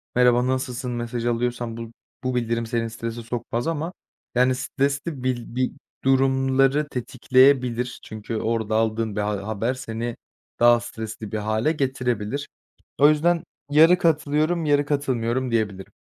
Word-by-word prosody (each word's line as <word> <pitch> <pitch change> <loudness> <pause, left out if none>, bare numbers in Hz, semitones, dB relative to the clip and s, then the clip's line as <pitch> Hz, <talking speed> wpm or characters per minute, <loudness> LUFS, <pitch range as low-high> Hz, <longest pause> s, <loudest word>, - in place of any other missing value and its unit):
“Merhaba, 125 0 +4
nasılsın?” 130 -1 -2
mesajı 120 0 -2
alıyorsan 120 -1 -2
bu 115 -1 -7 0.3
bu 130 0 -1
bildirim 115 -1 0
seni 115 0 -1
strese 115 +1 -5
sokmaz 120 +1 -3
ama, 165 +2 -2 0.4
yani, 125 +1 +4
stresli 140 +2 -2
bil 120 -2 -2
bir 130 0 +1 0.3
durumları 135 +2 +3
tetikleyebilir. 125 -1 +2
Çünkü 110 +1 -6
orada 110 -1 -1
aldığın 110 -1 0
bir 105 - 0
ha 105 0 -2
haber 110 +4 -1
seni 120 -2 -4 0.4
daha 120 0 +6
stresli 110 -2 -7
bir 110 - -2
hâle 110 +7 0
getirebilir. 130 -3 -2 0.5
O 145 +1 +8
yüzden 165 +2 +2 0.3
yarı 165 +4 +7
katılıyorum, 155 +1 +1
yarı 145 -1 +3
katılmıyorum 130 -3 -1
diyebilirim. 105 -4 -1
125 Hz, 135 wpm, -24 LUFS, 115-135 Hz, 0.5 s, O